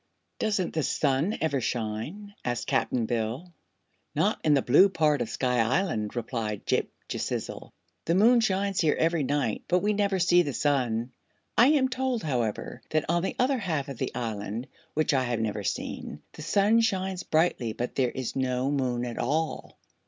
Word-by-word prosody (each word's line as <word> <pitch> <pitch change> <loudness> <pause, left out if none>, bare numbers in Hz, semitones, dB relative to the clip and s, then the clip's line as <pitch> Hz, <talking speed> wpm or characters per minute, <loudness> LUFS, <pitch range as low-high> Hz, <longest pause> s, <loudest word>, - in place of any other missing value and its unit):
"Doesn't 200 -5 0
the 160 - 0
sun 145 +8 +1
ever 140 -4 +1
shine?" 120 - -4
asked 120 -1 -2
Cap'n 130 -3 0
Bill. 120 +10 -3 0.6
"Not - - +1
in 150 -2 +4
the 135 - +2
blue 165 +11 +6
part 155 -6 +2
of 115 - -2
Sky 125 0 0
Island," 115 - 0
replied 115 -3 -3
Ghip - - +1 0.2
Ghisizzle. - - -4 0.3
"The 165 - +2
moon 235 +5 +6
shines 195 -3 +1
here 155 -3 +3
every 165 0 +2
night, 140 -5 -1
but 180 +1 +2
we 210 +1 +2
never 200 -1 +1
see 175 -1 +5
the 145 -5 -2
sun. 125 -4 0 0.4
I 240 - +6
am 285 -3 +4
told, 255 -2 -1
however, 120 -8 -2
that 155 -1 +1
on 175 - +2
the 190 - -2
other 260 +1 +2
half 160 -9 -2
of 135 - -7
the - - -3
Island 110 0 -4 0.3
which 155 -1 +2
I 130 -2 +2
have 120 -2 -1
never 105 -1 -2
seen 75 -5 -4
the - - -10
sun 205 +7 +3
shines 190 -4 -1
brightly 155 -9 +1
but 120 +2 -4
there 130 -2 +1
is 130 -1 -5
no 130 0 0
moon 125 -4 0
at 120 -1 -5
all." 155 +6 -2
145 Hz, 175 wpm, -27 LUFS, 120-190 Hz, 0.6 s, blue